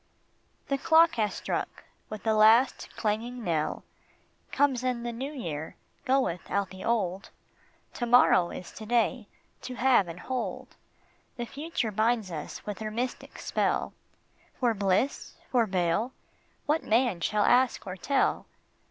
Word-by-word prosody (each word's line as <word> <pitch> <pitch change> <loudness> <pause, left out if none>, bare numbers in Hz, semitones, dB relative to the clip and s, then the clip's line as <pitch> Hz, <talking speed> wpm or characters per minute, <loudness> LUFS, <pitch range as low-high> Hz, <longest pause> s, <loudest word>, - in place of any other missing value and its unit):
The 275 -1 -1
clock 330 +3 +5
has 215 -2 0
struck - - -4 0.3
with 215 -2 -7
the 220 - +2
last 220 +4 +4
clanging 230 +3 -2
knell 160 -5 -1 0.7
Comes 270 -3 +2
in 250 -2 -1
the 240 - -3
new 260 +5 -5
year, 160 - -5 0.3
goeth 260 - 0
out 200 -2 -1
the 190 0 -9
old; 200 -5 -1 0.6
To 240 - -3
morrow 210 -7 +5
is 180 - -8
to 215 - -10
day, 235 -1 +1 0.3
to 255 - -6
have 245 -7 +4
and 170 +1 -8
hold; 240 -8 -4 0.6
The 240 - -3
future 280 -4 -3
binds 220 -1 +1
us 155 -3 -7
with 210 -1 -5
her 215 -1 -3
mystic 245 +4 -4
spell. - - -1 0.7
For 245 -3 +2
bliss? 200 +6 0 0.2
for 240 -3 +3
bale? 185 +6 0 0.5
what 305 +2 +1
man 230 -5 +2
shall 210 +4 +1
ask 255 0 +3
or 185 -1 -5
tell 270 +8 0
230 Hz, 145 wpm, -28 LUFS, 195-255 Hz, 0.7 s, clock